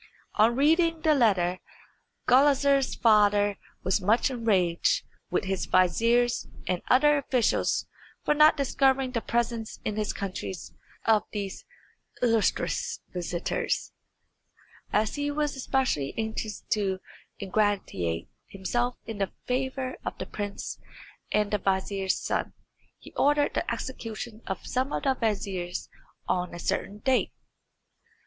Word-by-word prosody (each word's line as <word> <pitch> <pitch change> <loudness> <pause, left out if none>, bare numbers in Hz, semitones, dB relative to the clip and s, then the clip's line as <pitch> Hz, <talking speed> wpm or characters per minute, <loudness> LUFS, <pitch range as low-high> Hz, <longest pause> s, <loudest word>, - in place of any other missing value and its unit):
On 225 +3 +4
reading 325 +4 +3
the 310 -1 +4
letter 185 -9 +2 0.7
Gulizar's 275 +1 +4
father 205 -2 +4 0.2
was 190 +2 +1
much 220 +7 +3
enraged 225 - +2 0.3
with - - 0
his 190 -1 -2
viziers 230 +7 +3 0.2
and 180 -1 -1
other 295 +3 +5
officials 255 -4 +1 0.4
for - - +4
not 305 +1 +6
discovering 270 -1 +2
the 235 -2 -1
presence 235 -1 -2
in 210 -1 -2
his 215 -1 0
country 190 -1 -4 0.5
of 220 -2 +5
these 200 -2 -5 0.5
illustrious 230 -3 +1
visitors, 175 -1 -2 1.0
as 215 +1 +1
he 290 0 -1
was 295 0 -1
especially 255 - 0
anxious 220 -1 -3
to 195 -3 +1 0.4
ingratiate 190 - -1 0.2
himself 240 +6 -1
in 225 -3 -6
the 195 - -1
favour 260 0 -2
of - - -4
the - - -4
prince 205 -1 -5 0.5
and 210 -1 +1
the 210 - +1
vizier's 190 0 0
son. - - -2 0.4
He - - -14
ordered 290 0 +2
the - - -1
execution 225 -3 -5
of 190 - -4
some 260 +3 -1
of - - -2
the 270 - +3
viziers 195 -7 -2 0.4
on 180 -1 -1
a - - -7
certain 200 +4 -2
date. 265 -2 +1
220 Hz, 125 wpm, -27 LUFS, 195-260 Hz, 1.0 s, not